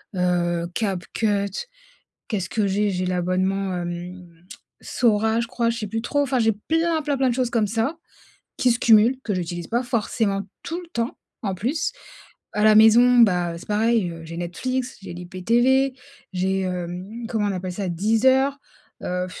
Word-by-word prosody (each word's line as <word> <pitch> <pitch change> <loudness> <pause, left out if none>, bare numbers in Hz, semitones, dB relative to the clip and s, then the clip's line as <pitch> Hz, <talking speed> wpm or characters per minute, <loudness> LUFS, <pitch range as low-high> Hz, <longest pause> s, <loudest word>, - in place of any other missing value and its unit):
heu, 175 -1 0
Capcut, 200 - -1 0.6
qu'est-ce 190 -5 -2
que 210 +2 +1
j'ai? 205 +2 +1
J'ai 185 -1 -2
l'abonnement, 185 +2 0
hum, 175 0 -8 0.4
Sora, 220 -1 +1
je 235 - -2
crois. 235 -1 0
Je 230 - -3
sais 215 - -3
plus 225 +3 -3
trop, 285 +4 0
enfin 265 -2 0
j'ai 225 -1 +4
plein, 325 +9 0
plein, 290 -1 -1
plein 265 -1 +3
de - - -1
choses 250 -1 0
comme 220 -4 +1
ça, 225 +9 -1 0.6
qui 250 - +3
se 235 - -1
cumulent, 230 +3 +5
que 210 - -1
j'utilise 175 -1 -4
pas 240 +2 0
forcément 220 -4 0 0.2
tout 345 +1 -4
le 350 - -13
temps, 235 -3 -3 0.2
en 195 -3 -1
plus. 270 - -1 0.6
À 210 - +1
la 215 0 +7
maison, 235 +3 +7
bah, 180 -6 +4
heu, - - -7
c'est - - -12
pareil, 215 -3 +2
heu, 165 -1 -9
j'ai 165 +1 -8
Netflix, 255 +9 -3
j'ai 195 - -7
l'IPTV, 235 +10 +1 0.4
j'ai, 190 +1 0
hem, 185 +5 -5
comment 215 -3 0
on - - -1
appelle 185 -1 -4
ça? 190 +1 -3
Deezer, 245 +10 +2 0.5
heu,, 180 0 -2
210 Hz, 175 wpm, -23 LUFS, 180-240 Hz, 0.6 s, la